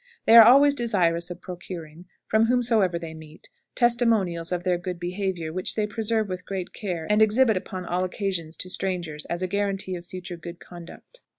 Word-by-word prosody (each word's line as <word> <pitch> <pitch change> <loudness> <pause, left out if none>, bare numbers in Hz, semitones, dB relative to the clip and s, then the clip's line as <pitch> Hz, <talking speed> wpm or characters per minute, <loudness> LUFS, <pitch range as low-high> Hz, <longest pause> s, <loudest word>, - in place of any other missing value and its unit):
They 225 - +6
are 225 -1 +11
always 280 +3 +7
desirous 180 -9 0
of 175 - -8
procuring, 175 -2 -9 0.2
from 220 +1 +3
whomsoever 225 -7 +2
they 165 -1 -7
meet, 160 0 -13 0.3
testimonials 225 -9 +2
of 175 -1 -2
their 180 -1 0
good 180 -1 -5
behavior, 175 -2 -3
which 185 +1 -1
they 215 - 0
preserve 220 0 -1
with 185 -1 -5
great 185 -1 -5
care, 175 -6 -4
and 210 +1 +2
exhibit 220 +1 +4
upon 185 0 -5
all 180 +1 -1
occasions 185 -4 -3
to 185 - -4
strangers 175 -6 -2
as 175 +2 -3
a - - 0
guarantee 195 -1 -2
of 175 - -8
future 180 0 -8
good 170 +1 -9
conduct. 175 - -13
185 Hz, 185 wpm, -25 LUFS, 175-215 Hz, 0.3 s, are